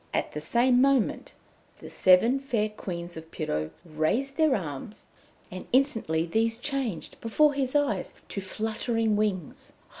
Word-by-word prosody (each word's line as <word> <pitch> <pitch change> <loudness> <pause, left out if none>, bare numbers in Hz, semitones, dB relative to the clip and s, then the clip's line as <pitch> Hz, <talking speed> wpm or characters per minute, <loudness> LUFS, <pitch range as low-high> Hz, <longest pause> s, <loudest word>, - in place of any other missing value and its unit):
At - - -1
the 150 - -5
same 245 +9 +3
moment 270 -4 +1 0.4
the - - -11
Seven 225 +9 +4
Fair 235 -6 -1
Queens 175 -4 -6
of 160 0 -9
Pirou 75 - -3 0.2
raised 170 - -1
their 310 -4 +3
arms, 165 - -6 0.5
and 185 0 -8
instantly 225 - +2
these 225 +6 +1
changed, 250 - -4
before 290 +6 +3
his 270 -1 -2
eyes, 290 -1 0
to 200 - -4
fluttering 220 +2 -1
wings. 200 -7 -2
220 Hz, 140 wpm, -27 LUFS, 175-260 Hz, 0.5 s, Seven